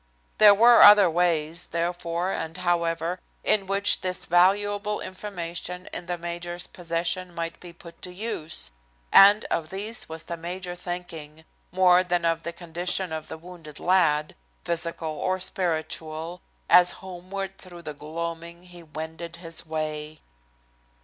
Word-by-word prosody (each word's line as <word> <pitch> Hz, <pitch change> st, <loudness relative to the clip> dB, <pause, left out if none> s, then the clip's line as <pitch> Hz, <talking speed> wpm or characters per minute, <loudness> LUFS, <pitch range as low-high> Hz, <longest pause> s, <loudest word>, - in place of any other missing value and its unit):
There 210 Hz, -1 st, +9 dB
were 235 Hz, +3 st, +7 dB
other 205 Hz, -2 st, +9 dB
ways, 165 Hz, -1 st, 0 dB
therefore 170 Hz, +1 st, -2 dB
and 160 Hz, -1 st, -4 dB
however, 170 Hz, -1 st, -1 dB, 0.2 s
in 195 Hz, -3 st, +3 dB
which 200 Hz, +1 st, +4 dB
this 185 Hz, -1 st, -3 dB
valuable 205 Hz, +4 st, +2 dB
information 180 Hz, -2 st, -5 dB
in 175 Hz, -, -5 dB
the 175 Hz, 0 st, -2 dB
major's 175 Hz, +1 st, -5 dB
possession 175 Hz, +1 st, -3 dB
might 165 Hz, -1 st, -4 dB
be 175 Hz, -, -10 dB
put 170 Hz, 0 st, -15 dB
to 180 Hz, -, -5 dB
use, 165 Hz, -, -4 dB, 0.4 s
and 205 Hz, +2 st, +7 dB
of 155 Hz, -2 st, -1 dB
these 210 Hz, +2 st, 0 dB
was 160 Hz, 0 st, -7 dB
the 170 Hz, -, -6 dB
major 175 Hz, +2 st, -5 dB
thinking, 165 Hz, -3 st, -7 dB, 0.3 s
more 180 Hz, 0 st, +5 dB
than 175 Hz, -1 st, -1 dB
of 165 Hz, 0 st, +1 dB
the 170 Hz, -, -4 dB
condition 175 Hz, +1 st, -1 dB
of 155 Hz, -1 st, -5 dB
the -, -, -7 dB
wounded 165 Hz, -3 st, -11 dB
lad, 160 Hz, -5 st, +2 dB, 0.3 s
physical 170 Hz, -1 st, 0 dB
or 185 Hz, 0 st, -1 dB
spiritual, 165 Hz, -1 st, -2 dB, 0.3 s
as 180 Hz, 0 st, +6 dB
homeward 190 Hz, +1 st, -6 dB
through 175 Hz, -2 st, -12 dB
the 150 Hz, -, -6 dB
gloaming 170 Hz, +3 st, -6 dB
he 175 Hz, -1 st, -12 dB
wended 160 Hz, +1 st, -7 dB
his 165 Hz, -1 st, -5 dB
way. 155 Hz, -1 st, -4 dB
175 Hz, 140 wpm, -25 LUFS, 165-185 Hz, 0.4 s, There